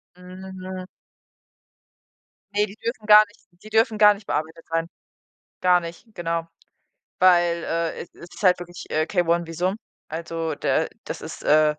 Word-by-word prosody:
Hm, 185 +1 -10
mhm. 185 0 -6 1.7
Ne, 210 +1 +2
die 200 - -12
dürfen 225 -1 -5
gar 210 0 +10
nicht 205 - -23 0.2
die 215 - -11
dürfen 220 0 +2
gar 210 0 +8
nicht 200 0 -14
bearbeitet 160 +2 -3
sein. 165 0 -1 0.7
Gar 180 -1 +5
nicht, 170 +6 -9
genau. 165 -1 -2 0.7
Weil, 175 -2 +4
äh, 165 0 -2
es - - -13
ist 175 +4 -12
halt 180 -2 +5
wirklich, 175 -1 -9
äh, 155 +1 +1
K-1 170 -2 +1
Visum. 180 +5 -1 0.3
Also, 165 0 -3
der - - +1 0.2
das - - -5
ist, - - -8
äh 155 +1 +5
175 Hz, 155 wpm, -24 LUFS, 165-200 Hz, 1.7 s, gar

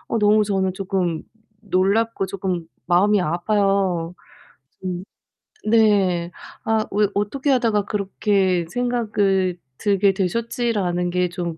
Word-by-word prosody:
어 230 - 0
너무 210 0 +4
저는 190 -2 0
쪼끔 185 -4 -2 0.4
놀랍고 205 +2 +1
쪼끔 185 -3 -3 0.2
마음이 195 +4 +3
아파요. 180 0 0 0.7
좀 180 -1 -4 0.6
네. 200 -6 +3 0.3
'아 220 -1 +1
왜 210 +1 +2
어떻게 260 +8 -1
하다가 225 -6 +2
그렇게 195 -3 0
생각을 210 -7 0 0.2
들게 200 -1 +2
되셨지?'라는 200 -2 -1
게 180 0 +1
좀 170 -1 -4
195 Hz, 225 characters per minute, -22 LUFS, 180-215 Hz, 0.7 s, 너무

